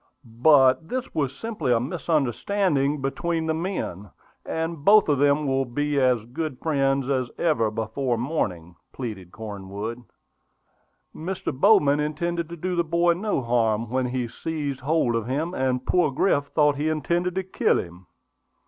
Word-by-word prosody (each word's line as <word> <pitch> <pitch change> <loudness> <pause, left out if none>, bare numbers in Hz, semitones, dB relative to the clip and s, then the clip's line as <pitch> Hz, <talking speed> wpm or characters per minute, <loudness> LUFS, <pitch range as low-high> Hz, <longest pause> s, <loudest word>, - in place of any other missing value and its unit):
"But 130 +5 +4
this 255 0 -4
was 140 -3 -1
simply 210 - -2
a 120 - +4
misunderstanding 150 - 0
between 165 +4 -1
the 160 - 0
men; 160 - -4 0.3
and 160 -2 -3
both 210 +4 +6
of 145 -3 +2
them 145 +1 +3
will 135 -1 +1
be 145 +3 -1
as 125 -4 +2
good 135 +3 -4
friends 135 -3 0
as 130 -3 0
ever 145 -10 +2
before 115 +3 -2
morning," 90 - -3 0.2
pleaded 105 -8 -6
Cornwood. 105 +2 -6 1.1
"Mr. 185 +4 -4
Bowman 145 -2 +4
intended 165 +3 -2
to 170 - -7
do 180 +2 -2
the 170 - +2
boy 170 +1 +2
no 185 -6 -2
harm 115 -1 +1
when 130 0 0
he 125 -1 -2
seized 145 +1 -4
hold 140 -3 +1
of 115 -1 -2
him; 155 +7 -2
and 130 -4 -1
poor 175 -4 +3
Griff 140 +1 +1
thought 145 0 +2
he 150 +2 0
intended 170 +4 -1
to 190 - -1
kill 185 - +1
him." 90 +1 -7
140 Hz, 155 wpm, -24 LUFS, 120-165 Hz, 1.1 s, both